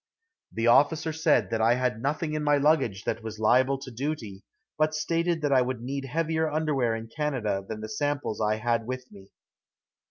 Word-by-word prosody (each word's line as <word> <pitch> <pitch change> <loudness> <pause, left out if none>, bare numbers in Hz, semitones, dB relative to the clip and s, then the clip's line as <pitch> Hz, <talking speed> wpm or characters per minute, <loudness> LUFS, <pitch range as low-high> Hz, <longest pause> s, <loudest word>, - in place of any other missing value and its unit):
The 115 - -2
officer 155 +6 +4
said 160 -5 +2
that 115 -1 0
I 115 +2 +4
had 125 -3 -1
nothing 150 +3 -1
in 155 0 -2
my 145 -1 +3
luggage 135 -9 +2
that 115 - -2
was 110 -1 -7
liable 130 +5 +3
to 135 -1 -9
duty, 120 -6 -4 0.3
but 155 0 +1
stated 165 +1 0
that 145 -1 +2
I 130 - +5
would 125 -1 -2
need 135 +2 -4
heavier 160 +3 0
underwear 145 -7 0
in 115 0 -6
Canada 115 -8 -2
than 110 -1 -5
the 110 - -5
samples 140 0 -2
I 105 0 +2
had 115 0 -1
with 130 0 -6
me. 100 -1 -15
130 Hz, 190 wpm, -27 LUFS, 115-150 Hz, 0.3 s, I